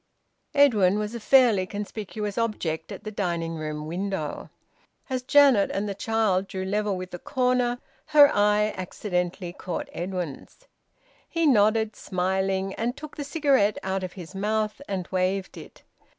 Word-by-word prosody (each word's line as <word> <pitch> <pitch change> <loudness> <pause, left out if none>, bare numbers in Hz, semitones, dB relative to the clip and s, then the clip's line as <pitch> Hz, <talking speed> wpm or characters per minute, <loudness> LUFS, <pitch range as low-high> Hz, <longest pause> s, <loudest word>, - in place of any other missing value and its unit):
Edwin 210 -9 +5
was 210 +1 -3
a 235 - -4
fairly 230 -6 +4
conspicuous 210 0 -5
object 175 -9 -2
at - - -8
the 215 - -5
dining 170 -5 -2
room 155 -1 -5
window. 175 -1 -4 0.6
As 255 -1 0
Janet 265 -5 +5
and 200 +2 -2
the 200 - -2
child 200 -2 0
drew 190 -1 -4
level 205 0 0
with 185 0 -7
the 175 - -6
corner 250 0 +1 0.3
her 300 -2 +8
eye 210 +1 +3
accidentally 180 -1 -3
caught 180 -1 -5
Edwin's. 180 - -6 0.6
He 335 -1 0
nodded, 220 -4 +3
smiling, 190 +1 -1
and 240 +3 -2
took 305 -1 -9
the 290 - -4
cigarette 275 -8 +2
out 190 0 -1
of 185 - -5
his 180 -2 -10
mouth 215 +4 -1
and 185 -3 -3
waved 185 +1 -1
it. - - -12
205 Hz, 150 wpm, -26 LUFS, 185-230 Hz, 0.6 s, her